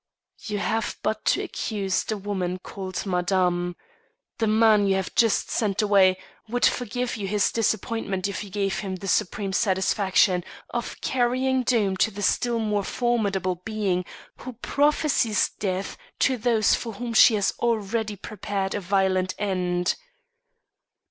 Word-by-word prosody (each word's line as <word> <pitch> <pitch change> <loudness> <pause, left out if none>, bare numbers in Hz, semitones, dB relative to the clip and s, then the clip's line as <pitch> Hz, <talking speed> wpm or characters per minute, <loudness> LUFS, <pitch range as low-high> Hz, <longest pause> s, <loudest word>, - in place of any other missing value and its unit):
"You 210 -2 -4
have 220 +2 -1
but 215 0 -1
to - - +2
accuse 200 -4 -2
the 215 - -3
woman 190 -3 -3
called 190 -1 -5
Madame. 180 -1 0 0.6
The 225 - +1
man 215 -1 +4
you 195 - +3
have 190 -1 -3
just 225 -3 +2
sent 205 -5 0
away 195 -3 +4 0.3
would 245 +2 +2
forgive 245 +1 -1
you 200 -2 -4
his 205 0 +1
disappointment 215 -3 -1
if 200 -2 -4
you 205 - -10
gave 195 0 -1
him 190 -2 -4
the 195 +2 -7
supreme 195 0 0
satisfaction 190 -1 +2 0.3
of 240 0 -4
carrying 260 +1 +1
doom 220 -6 +1
to 205 - +3
the 205 -1 -6
still 240 +4 +1
more 210 -2 0
formidable 195 -7 -1
being 205 -5 -1 0.3
who 255 - -8
prophesies 280 -3 +1
death 190 -1 -2 0.2
to 265 - +2
those 230 -3 +2
for 230 -2 -2
whom 235 +3 -5
she 225 0 +7
has 200 -2 +1
already 220 -2 -1
prepared 200 -1 -4
a - - -1
violent 185 -1 +1
end." 180 -3 0
205 Hz, 145 wpm, -25 LUFS, 190-225 Hz, 0.6 s, she